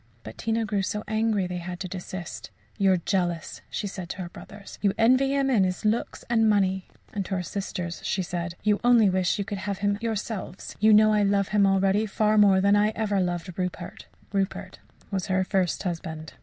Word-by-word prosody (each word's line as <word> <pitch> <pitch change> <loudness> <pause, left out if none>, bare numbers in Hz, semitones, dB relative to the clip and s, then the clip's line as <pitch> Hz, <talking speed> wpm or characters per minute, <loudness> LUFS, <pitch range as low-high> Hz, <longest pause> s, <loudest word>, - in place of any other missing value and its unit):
But 110 - -9
Tina 225 0 0
grew 210 -2 0
so 210 +2 -3
angry 215 -2 +1
they 180 0 -4
had 175 0 -6
to 185 - -3
desist. 185 -1 -7 0.3
"You 195 -1 +4
are - - +3
jealous," 175 -2 -2
she - - -3
said 185 -3 -6
to 190 - -5
her 175 - -7
brothers. 200 +3 -12
"You 200 -2 +2
envy 255 +4 +4
him 275 -1 +2
his 190 -6 +1
looks 220 +2 -1
and 225 -2 +3
money." 190 -2 +1 0.3
And 205 -2 -1
to 195 - -2
her 180 - -2
sisters 180 -2 -4
she 190 - -1
said, 170 -1 -4
"You 210 0 +2
only 235 -5 +5
wish 185 -1 +1
you 200 - -2
could 200 -1 -4
have 200 0 -3
had 205 - -1
him 200 - -1
yourselves. 220 -4 -4
You 215 +1 +5
know 215 0 +6
I 210 - +3
love 200 -1 +2
him 205 -2 +4
already 195 +2 +2
far 215 +1 +2
more 195 -2 +6
than 200 +2 +4
I 210 +1 +4
ever 210 -3 0
loved 175 -1 -2
Rupert." 180 -1 -5 0.3
(Rupert 195 -1 -2 0.3
was 190 -2 -2
her 190 -1 +2
first 185 -2 0
husband.) 160 -3 -5
195 Hz, 210 wpm, -26 LUFS, 185-210 Hz, 0.3 s, know